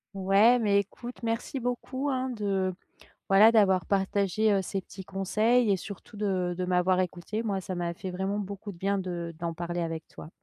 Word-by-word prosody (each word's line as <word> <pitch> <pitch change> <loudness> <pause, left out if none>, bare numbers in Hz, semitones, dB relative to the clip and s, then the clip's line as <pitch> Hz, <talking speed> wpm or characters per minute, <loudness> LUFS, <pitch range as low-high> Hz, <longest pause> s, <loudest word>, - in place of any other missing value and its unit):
Ouais. 200 +6 +5
Mais, 205 -2 +3
écoute, 240 +5 -10
merci 230 +4 -2
beaucoup, 255 +3 -3
hein, 260 0 -1
de, 195 -5 -1 0.6
voilà, 205 +4 +7
d'avoir 190 -5 +4
partagé, 200 +2 +1
heu, 195 - +3
ces 195 +1 -3
petits 190 +1 -11
conseils 215 +5 +2
et 195 - +4
surtout 200 +3 -9
de 190 -4 0
de 185 - 0
m'avoir 180 0 +2
écoutée. 185 +5 -2
Moi, 195 -3 -1
ça 185 0 -5
m'a 170 -1 -2
fait 190 +1 -6
vraiment 190 +3 -2
beaucoup 200 +1 -6
de - - -14
bien 200 +2 0
de 175 -2 -4
d'en 170 -1 -3
parler 175 +1 -3
avec 165 -1 -4
toi. - - -11
195 Hz, 190 wpm, -28 LUFS, 180-215 Hz, 0.6 s, voilà